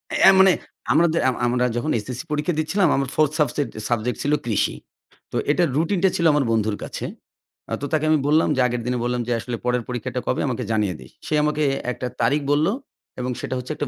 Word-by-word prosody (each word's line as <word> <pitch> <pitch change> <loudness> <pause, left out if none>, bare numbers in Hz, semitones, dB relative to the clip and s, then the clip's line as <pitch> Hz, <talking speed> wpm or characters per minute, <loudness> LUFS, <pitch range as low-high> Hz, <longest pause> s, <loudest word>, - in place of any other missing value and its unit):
এ - - +7
মানে 190 -1 +7 0.4
আমরাদে 165 0 +3
আমরা 125 - -3
আমরা 125 +1 +1
যখন 155 +6 -1
SSC 125 +1 -5
পরীক্ষা 150 +3 0
দিচ্ছিলাম, 175 +4 +2
আমার 135 -1 -1
4th 155 -2 +3
সাবসেক্ট 145 -4 0 0.2
সাবজেক্ট 120 +1 0
ছিল 145 - +1
কৃষি। 110 -4 0 0.6
তো - - -7 0.2
এটার 170 0 +2
রুটিনটা 185 +4 +2
ছিল 170 - 0
আমার 145 -3 +2
বন্ধুর 110 -2 +1
কাছে। - - -5 0.7
আ - - -1
তো - - -2
তাকে 155 0 +2
আমি 155 - +4
বললাম 155 +2 +3
যে 130 - +2
আগের 120 0 -2
দিনে 125 - 0
বললাম 125 0 -1
যে, 120 - -2
"আসলে 115 +2 -4
পরের 125 -1 +1
পরীক্ষাটা 120 -3 -3
কবে - - 0
আমাকে - - -2
জানিয়ে 105 -5 0
দিস।" 65 -1 -13 0.2
সে - - -2
আমাকে 150 0 +1 0.3
একটা 125 +1 -4
তারিখ 140 +6 +2
বলল 150 +3 +3 0.5
এবং 125 0 -2
সেটা 130 - -3
হচ্ছে 125 +3 -5
একটা 145 - -3
135 Hz, 210 wpm, -22 LUFS, 120-155 Hz, 0.7 s, এ